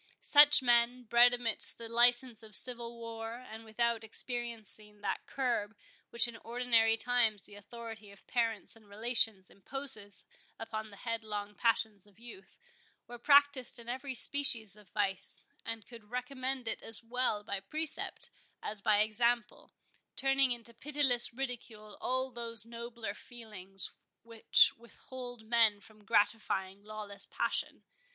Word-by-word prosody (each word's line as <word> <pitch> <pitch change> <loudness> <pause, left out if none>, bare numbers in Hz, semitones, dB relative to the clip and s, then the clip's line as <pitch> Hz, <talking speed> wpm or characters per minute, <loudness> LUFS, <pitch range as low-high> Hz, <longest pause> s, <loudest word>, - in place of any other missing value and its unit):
Such 290 -2 +6
men, 240 +1 +2
bred 240 +1 +5
amidst 240 -2 +2
the 230 - -8
license 240 0 +5
of 215 -1 -5
civil 235 -2 +2
war, 225 -1 -7
and 225 -2 -11
without 225 +1 -1
experiencing 220 -3 -5
that 205 - -4
curb 235 -5 -2 0.3
which 235 0 +5
in 235 -1 -8
ordinary 230 -1 +2
times 230 -4 +1
the - - -9
authority 220 +1 -10
of 200 - -17
parents 230 -3 -2
and 215 -2 -21
relations 220 -2 +1
imposes 215 -2 -3 0.3
upon 220 -1 -6
the 200 - -14
headlong 215 -2 -5
passions 220 -3 -1
of 205 - -24
youth, 220 -5 -14 0.5
were 240 0 -10
practised 285 -1 +3
in 235 -1 -12
every 260 +2 -5
species 235 -6 +4
of 210 -2 -19
vice, 195 -3 -2 0.2
and 225 -2 -6
could 230 -3 -13
recommend 255 0 -3
it - - +1
as 225 +1 +3
well 235 -3 -1
by 200 -1 -4
precept 305 +11 -5 0.3
as 210 -1 -5
by 210 0 +3
example, 235 +2 0 0.4
turning 270 -1 +2
into 235 -1 -4
pitiless 270 -2 +3
ridicule 235 -4 -7
all 260 +1 -1
those 230 -2 -5
nobler 235 -2 -7
feelings 210 -5 -4 0.3
which 230 -1 +3
withhold 245 0 -11
men 225 -2 +3
from 215 +1 -19
gratifying 200 -2 0
lawless 210 -2 -6
passion. - - -3
230 Hz, 135 wpm, -32 LUFS, 215-245 Hz, 0.5 s, Such